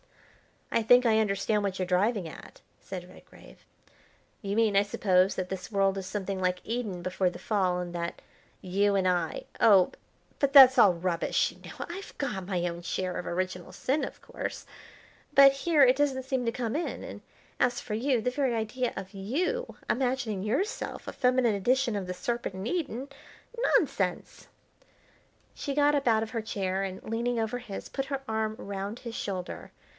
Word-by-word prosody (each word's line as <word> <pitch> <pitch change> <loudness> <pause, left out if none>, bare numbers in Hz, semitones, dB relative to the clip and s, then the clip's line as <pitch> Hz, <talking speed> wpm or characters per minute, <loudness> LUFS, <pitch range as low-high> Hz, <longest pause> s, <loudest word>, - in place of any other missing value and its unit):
"I 230 - +2
think 245 +3 +5
I 220 -1 +4
understand 210 0 +1
what 195 -2 -2
you're 185 - -1
driving 190 +1 +1
at," 155 - -12 0.2
said 180 -2 -7
Redgrave; - - -17 0.8
"you 200 -2 -3
mean, 220 -2 +3
I - - +7
suppose, 190 -2 +2
that 185 -1 -3
this 190 -1 -5
world 195 -1 +2
is 190 -1 -5
something 195 -1 -3
like 180 -1 0
Eden 220 -6 -3
before 185 0 +1
the - - -9
fall, 190 -4 0
and 175 -1 -5
that 170 0 -4 0.4
you 200 +2 +1
and 190 -1 +2
I 175 -3 0 0.2
oh 195 -4 +6 0.5
but 280 -1 +1
that's 260 -2 +10
all 200 -5 +7
rubbish 170 0 0
you - - -17
know. - - -6
I've 375 +3 -8
got 205 -10 -3
my 180 -3 -1
own 170 0 -5
share 185 +1 -3
of 180 - -5
original 180 0 -3
sin, 280 +4 0
of - - -6
course, - - -6 0.7
but 275 0 +9
here 290 +2 +3
it 255 0 +5
doesn't 275 -3 +1
seem 260 -2 -1
to 230 - +1
come 235 0 -2
in; 335 - -3
and - - -8 0.4
as 245 -1 +2
for 215 - -6
you, 245 +2 +1
the 250 - 0
very 260 -2 0
idea 230 +3 -2
of 190 +1 -7
you 345 - -2
imagining 245 -5 0
yourself 275 - -2
a - - -5
feminine 250 -2 +2
edition 240 +4 +1
of 190 -2 -4
the 180 - -3
Serpent 235 0 -3
in 190 +1 -5
Eden. 275 -3 -3 0.7
Nonsense!" - - -1 1.1
She 280 -2 -4
got 290 0 +4
up 280 -3 0
out 220 -1 +4
of 220 - -7
her 230 - -2
chair 195 -3 -2
and, 190 -1 -5
leaning 235 +2 -1
over 225 +2 -1
his, 210 -5 -8
put 270 - -3
her 275 0 -3
arm 220 0 -1
round 200 +3 -5
his 235 -2 -7
shoulder. 185 -5 -5
215 Hz, 180 wpm, -28 LUFS, 190-255 Hz, 1.1 s, that's